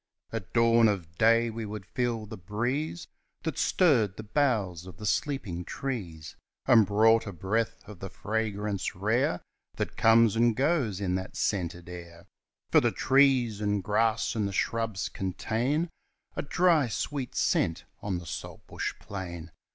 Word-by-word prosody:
At 105 -6 -5
dawn 115 -1 +5
of 90 -6 -2
day 115 +1 +4
we 115 +1 -5
would 105 -2 -6
feel 115 0 -2
the 110 +1 -8
breeze 120 - -3 0.4
That 160 -4 -3
stirred 120 - +3
the 110 - -6
boughs 105 - 0
of 90 -2 -11
the 105 - -7
sleeping 105 -8 -1
trees, 90 - -5 0.3
And 110 -4 +6
brought 110 +2 +4
a - - -4
breath 105 +7 -2
of 105 -4 -11
the 95 - -6
fragrance 105 -1 -2
rare 105 0 +1 0.3
That - - -4
comes 115 -1 +5
and 115 0 +3
goes 130 - +1
in 95 -3 -1
that 95 +1 -7
scented 85 -3 -2
air; 85 -1 -10 0.5
For - - +6
the - - +3
trees 130 -6 +3
and 105 -2 0
grass 110 +3 +1
and 105 -3 0
the 100 - -5
shrubs 115 -1 -1
contain 120 - -1 0.4
A - - -1
dry 165 -2 +3
sweet 130 +3 -3
scent 80 - +1 0.2
on 100 -3 -2
the 85 - -8
saltbush - - -5
plain. 85 -4 -7
110 Hz, 150 wpm, -28 LUFS, 95-120 Hz, 0.5 s, And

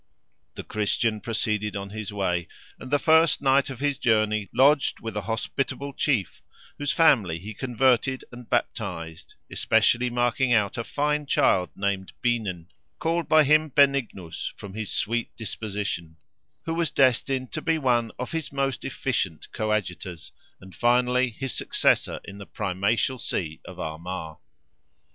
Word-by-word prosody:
The - - -6
Christian 110 +1 0
proceeded 105 -1 -1
on 100 0 -5
his 110 -1 -5
way, 90 -4 -1 0.3
and 130 - -9
the 145 - +3
first 160 +2 +4
night 135 0 +3
of 130 -3 -7
his 145 -2 0
journey 110 -3 +2
lodged 140 +3 +4
with 115 -2 -6
a 105 - -1
hospitable 135 +4 -2
chief, 125 - 0 0.4
whose 145 0 0
family 115 - +4
he 100 +6 -8
converted 130 +2 +1
and 120 -1 -11
baptized, 90 -9 -3 0.2
especially 120 +2 +3
marking 120 +1 +1
out 105 -4 +2
a 115 - -2
fine 150 +3 -1
child 90 -8 +2
named 100 -1 -2
Beanen, 105 -9 -1 0.3
called 165 0 -1
by 155 -1 +7
him 155 +2 +4
Benignus, 135 - +1
from 100 -2 -10
his 110 -1 -4
sweet 115 +2 -1
disposition; 100 -7 -4 0.5
who 165 - -2
was 165 -2 0
destined 130 0 +2
to 155 - -3
be 165 0 +1
one 120 -6 +1
of 125 - -5
his 165 -3 -3
most 135 -1 -1
efficient 80 - -2
coadjutors, 95 -6 -3 0.3
and 95 0 -14
finally 125 +5 +3
his 130 +3 -5
successor - - +1
in 100 0 -10
the 100 - -9
Primatial 105 +6 0
see 80 -8 -3
of - - -10
Armagh. 80 0 -5
115 Hz, 145 wpm, -26 LUFS, 100-135 Hz, 0.5 s, by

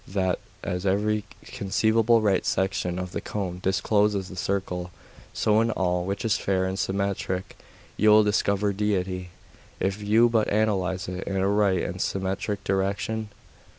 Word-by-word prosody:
That, 95 -1 0 0.2
as 90 +1 -3
every 105 +2 +1 0.2
conceivable 110 +3 +2
right 100 -3 +2
section 95 -2 -1
of 90 -1 -4
the - - -4
cone 95 -4 -4
discloses 100 0 +1
the 95 - -9
circle, 90 -1 -2 0.4
so 110 0 +2
in 115 - +1
all 90 -4 0
which 100 +4 -3
is 115 0 +2
fair 95 -1 0
and 95 +1 -3
symmetric 95 -1 -2 0.4
you 110 - +4
will 105 0 +7
discover 100 -1 +1
Deity, 95 -3 -1 0.5
if 95 +2 -1
you 110 +3 +4
but 115 -2 +2
analyse 95 -4 0
it 90 0 -5
in 100 - -2
a 95 +1 +2
right 100 -2 +2
and - - -4
symmetric 95 +1 -2
direction? 100 +3 -1
100 Hz, 150 wpm, -26 LUFS, 95-105 Hz, 0.5 s, will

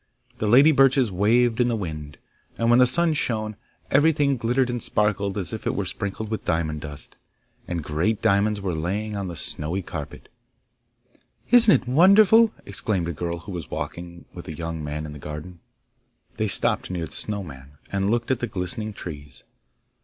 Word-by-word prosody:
The 110 - -1
lady 135 +8 +7
birches 135 -4 +4
waved 115 +5 +2
in 120 - +3
the 120 - 0
wind; 75 -7 -6 0.4
and 115 0 +2
when 120 - +6
the 125 - +6
sun 165 +5 +2
shone, 110 -7 -1 0.4
everything 145 -1 +3
glittered 125 +2 +1
and 120 -1 -3
sparkled 105 -2 0
as 95 -1 -3
if 110 - -5
it - - 0
were 100 - -2
sprinkled 100 +3 -5
with 110 - -3
diamond 80 -3 -1
dust, 75 -2 -7 0.5
and 85 -3 -3
great 85 +9 0
diamonds 105 -1 +2
were 95 -3 -2
lying 100 +7 -3
on 100 -2 -3
the 85 - -6
snowy 80 +5 -3
carpet. - - -8 1.2
'Isn't 235 -3 +7
it - - -18
wonderful?' 200 - +6
exclaimed 95 -3 -2
a - - -3
girl 85 +2 -3
who 100 - -9
was 90 -2 -6
walking 85 +2 -6
with - - -10
a 80 - -5
young 80 -1 -5
man 75 +1 -4
in 75 - -8
the 75 - -10
garden. 75 +5 -8 0.8
They 110 -1 0
stopped 95 - 0
near 90 -3 -3
the 75 - -13
Snow 105 -2 -2
man, 70 -3 -12 0.2
and 100 0 0
looked 120 +3 0
at 130 - +1
the 120 - -2
glistening 105 +2 -4
trees. 75 -8 -9
100 Hz, 185 wpm, -24 LUFS, 85-120 Hz, 1.2 s, lady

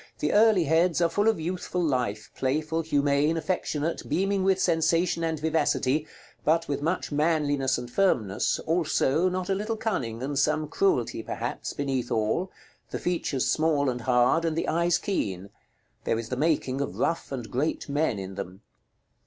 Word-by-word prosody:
The 150 - -1
early 215 -3 +5
heads 160 +2 +2
are 170 -1 +3
full 205 +5 +1
of 225 -5 +3
youthful 180 +2 -2
life, 125 -8 -1
playful, 155 +5 -1
humane, 145 0 +1
affectionate, 160 -1 -2
beaming 195 +1 +1
with 190 0 +2
sensation 165 0 +2
and 160 -2 -1
vivacity, 150 -2 +1 0.4
but 165 +2 +2
with 145 -1 -2
much 165 +3 -1
manliness 145 -3 +1
and 120 0 -6
firmness, 120 - +1
also, 165 0 +2
not 185 0 -3
a 195 - +1
little 215 +3 -2
cunning, 125 - -2
and 140 0 -1
some 155 +1 +1
cruelty 390 - 0
perhaps, - - -4
beneath 135 -4 -2
all; 110 - 0 0.4
the - - -3
features 165 -7 -1
small 150 -4 +2
and 125 0 -5
hard, 125 +6 +3
and 165 -1 -1
the - - -1
eyes 170 +2 +2
keen. 100 - -3 0.5
There 115 - 0
is 115 0 -5
the 125 - -2
making 140 -2 0
of 140 - -4
rough 165 - -1
and 125 -4 -5
great 140 +6 -1
men 145 -5 0
in 95 0 -6
them. 95 +1 -7
155 Hz, 165 wpm, -27 LUFS, 130-170 Hz, 0.5 s, early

